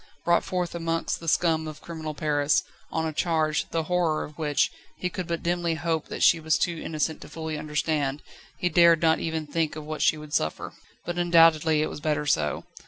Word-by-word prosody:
Brought 170 0 +3
forth 180 -2 -2
amongst 165 -1 -2
the 165 - -10
scum 160 -1 +2
of 155 -1 -8
criminal 160 -2 -6
Paris, 145 0 +1 0.3
on 160 0 -1
a 160 - -3
charge, 155 -2 0
the 165 -1 -1
horror 170 -2 0
of 150 - -10
which, 150 -2 +1 0.3
he 180 - -3
could 180 -1 -5
but 170 -1 -3
dimly 170 -1 0
hope 160 -1 -2
that - - -3
she 170 - +6
was 155 -1 +1
too 175 - 0
innocent 155 0 -2
to - - -10
fully 160 0 -5
understand, 150 -1 -1 0.3
he 180 - 0
dared 170 -2 +5
not 160 -1 +4
even 160 -1 -2
think 155 +1 -1
of 155 -1 -7
what 155 0 -5
she 155 - +3
would 150 -1 -10
suffer. 80 - -1 0.3
But 175 0 -3
undoubtedly 165 -3 +5
it - - -2
was - - -7
better 150 -1 -1
so. 75 - 0
160 Hz, 205 wpm, -26 LUFS, 150-170 Hz, 0.3 s, she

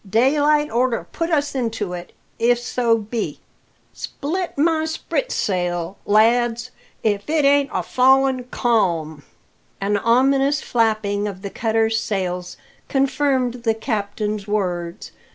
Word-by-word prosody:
Daylight 290 +6 +3
orter 240 0 0
put 330 0 -2
us 290 -3 +1
into 225 -7 -2
it, 175 0 -7 0.3
if 240 +1 +3
so 240 -1 +1
be 220 +1 -4 0.5
Split 345 +4 -4
my 315 +1 +2
sprit - - -2
sail, 175 -1 -1
lads, 230 +3 +3 0.3
if 205 +2 0
it 310 -2 +2
ain't 280 0 +4
a - - -1
fallin' 265 0 +3
calm!" 170 -12 0 0.6
[Illustration: 200 +1 -1
0074] 230 - +2
An 235 - +6
ominous 275 +2 +2
flapping 215 -3 0
of 195 -1 -7
the 200 - -5
cutter's 225 0 +1
sails 180 -3 -3 0.3
confirmed 265 -2 +1
the 225 -2 +1
captain's 210 -2 -3
words. 180 -3 -2
230 Hz, 130 wpm, -21 LUFS, 205-270 Hz, 0.6 s, An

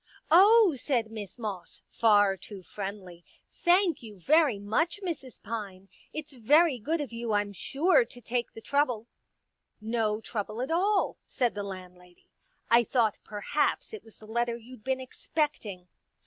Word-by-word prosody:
'* - - -24
" - - -35
Oh," 400 +2 +7
said 240 -4 -1
Miss 210 -2 -7
Moss, 205 -6 -6
far 205 -3 +4
too 190 +1 -10
friendly, 190 -3 -7 0.2
" - - -47
thank 355 -2 +4
you 215 -4 -11
very 295 - +4
much, 230 - 0
Mrs. 300 -8 -5
Pine. 200 -4 -6 0.2
It's 305 -1 -7
very 280 +4 +4
good 315 +10 -1
of 275 -5 -6
you, 230 -1 -3
I'm 205 0 0
sure, 345 - +3
to 260 - -12
take 240 +1 -2
the 225 - -10
trouble." 255 -5 0 0.5
*' - - -52 0.2
No 215 -1 +1
trouble 215 0 -4
at 265 - -3
all," 390 +4 +2
said 245 -3 0
the 205 - -4
landlady. 180 -2 -10 0.2
" - - -41
I 235 +1 +7
thought 230 -3 +1
perhaps 215 - -1
it 440 - -7
was 225 - -17
the 215 - -14
letter 235 +1 -1
you'd 235 -1 -14
been 265 +1 -1
expecting." 255 - -3
230 Hz, 170 wpm, -29 LUFS, 205-295 Hz, 0.5 s, Oh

